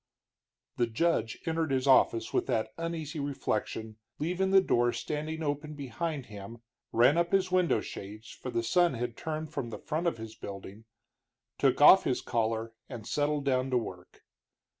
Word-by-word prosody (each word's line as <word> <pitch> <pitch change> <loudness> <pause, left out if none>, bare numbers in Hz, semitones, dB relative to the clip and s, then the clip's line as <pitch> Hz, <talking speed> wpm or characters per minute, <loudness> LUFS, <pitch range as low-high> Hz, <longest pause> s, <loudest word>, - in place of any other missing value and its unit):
The 120 - +2
judge 115 -2 0
entered 160 -1 0
his 130 -1 0
office 115 -4 +4
with - - +1
that 110 -1 -1
uneasy 165 -2 -4
reflection, 110 -6 -3 0.2
leaving 180 +5 0
the 195 0 +7
door 120 -10 +2
standing 155 +1 -4
open 150 +1 -3
behind 145 +1 -4
him, 105 +3 -10 0.3
ran 125 +8 +5
up 170 0 0
his 190 -1 +2
window 185 -2 +3
shades, 105 +2 -8
for 130 - -7
the 115 -2 -1
sun 175 +5 +3
had 120 0 -3
turned 155 +1 -5
from 120 - -3
the 115 - -6
front 160 +2 -2
of 165 - 0
his 110 0 -8
building, 100 0 -9 0.7
took - - +3
off - - +9
his - - 0
collar, 115 0 -1 0.2
and 115 -4 -7
settled 145 +1 0
down 130 -1 +1
to 130 - +2
work. 90 -6 -7
135 Hz, 165 wpm, -30 LUFS, 115-160 Hz, 0.7 s, off